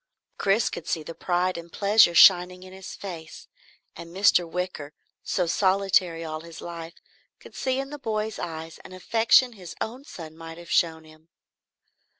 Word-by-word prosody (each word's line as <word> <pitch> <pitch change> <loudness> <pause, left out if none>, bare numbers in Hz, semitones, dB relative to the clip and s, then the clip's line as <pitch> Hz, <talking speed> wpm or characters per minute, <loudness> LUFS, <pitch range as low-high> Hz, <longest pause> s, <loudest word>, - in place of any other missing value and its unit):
Chris 200 +3 +2
could - - -7
see 160 -3 -1
the 165 - -8
pride 180 +1 -1
and 170 0 -12
pleasure 200 -3 +4
shining 180 +1 +6
in 185 0 -12
his 190 0 -9
face, 165 -5 -9 0.5
and 170 - -9
Mr. 180 -1 +3
Wicker, 180 -5 -4 0.3
so 180 - 0
solitary 185 -2 +2
all 155 0 -5
his 165 0 -11
life, 170 0 -8 0.4
could - - -15
see 260 0 -1
in 270 +1 -4
the 295 - -7
boy's 220 -4 -3
eyes 160 -1 -6
an - - -13
affection 230 +6 +3
his 180 -5 -10
own 245 +5 -5
son 160 - -10
might 165 0 -10
have 170 0 -11
shown 160 -2 +2
him. 155 +1 -19
180 Hz, 165 wpm, -25 LUFS, 165-200 Hz, 0.5 s, shining